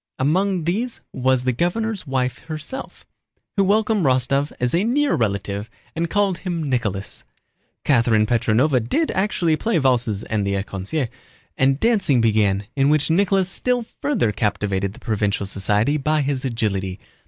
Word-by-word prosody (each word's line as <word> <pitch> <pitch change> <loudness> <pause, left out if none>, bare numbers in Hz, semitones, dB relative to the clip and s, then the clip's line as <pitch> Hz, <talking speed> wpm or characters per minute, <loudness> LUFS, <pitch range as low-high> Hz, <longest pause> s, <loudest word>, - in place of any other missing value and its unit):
Among 180 +6 +1
these 220 +9 -1
was 130 0 +1
the 130 - +2
governor's 185 - -1
wife 130 -1 -1
herself, 160 - -7 0.5
who 200 - +3
welcomed 210 0 +2
Rostóv 135 +2 +2
as 125 0 0
a 175 +3 +2
near 275 +6 +2
relative 100 -1 -1 0.3
and 165 0 -1
called 200 -2 +1
him 170 -5 -3
"Nicholas." 105 -7 -2 0.6
Catherine 115 -5 +3
Petróvna 115 +3 +2 0.2
did 325 -1 +1
actually 185 -5 +1
play 225 +1 0
valses 120 -7 +1
and 110 -2 -1
the 100 0 -1
écossaise, 100 +8 -3 0.5
and 135 +1 +2
dancing 205 - +3
began 105 -3 +2
in 135 0 +3
which 155 +1 +2
Nicholas 190 +1 +3
still 245 +4 0 0.2
further 255 - +1
captivated 100 -2 -1
the - - -14
provincial 105 -2 -1
society 105 +8 +1
by 150 +2 +1
his 140 -2 -1
agility. 100 -6 -2
135 Hz, 145 wpm, -22 LUFS, 110-185 Hz, 0.6 s, who